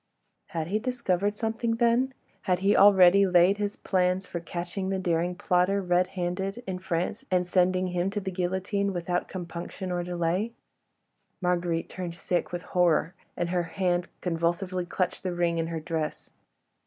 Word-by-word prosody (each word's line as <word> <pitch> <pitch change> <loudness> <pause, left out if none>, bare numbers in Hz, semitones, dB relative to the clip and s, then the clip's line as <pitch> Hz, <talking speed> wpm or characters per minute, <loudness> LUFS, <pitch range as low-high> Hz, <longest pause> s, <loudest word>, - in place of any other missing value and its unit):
Had 165 -2 -3
he 210 +3 +1
discovered 210 -5 0
something 225 +1 -1
then? 240 +3 +2 0.3
Had 180 0 +2
he 200 +1 +4
already 195 -1 +7
laid 180 +2 +5
his 205 0 -2
plans 185 0 +1
for 175 - -5
catching 175 +3 -4
the 195 - 0
daring 175 -1 0
plotter, 180 +3 +2
red 180 -1 +2
handed, 190 +6 -2
in 185 -3 -4
France, 185 +5 -2
and 180 -1 +2
sending 185 +1 +2
him 180 +1 0
to 205 +1 -2
the 190 -1 -4
guillotine 190 +2 -1
without 175 0 -1
compunction 180 +1 -6
or 175 0 0
delay? 175 +5 -1 0.9
Marguerite 175 -2 0
turned 175 -2 -6
sick 175 0 -1
with 175 0 -4
horror, 175 -1 +2 0.2
and 175 - -1
her 180 -1 +2 0.2
hand 180 -2 +1
convulsively 175 +1 -1
clutched 180 0 -1
the 185 -2 -3
ring 170 -1 +1
in 165 - -1
her 165 -1 -3
dress. 160 -1 -4
180 Hz, 160 wpm, -27 LUFS, 175-195 Hz, 0.9 s, already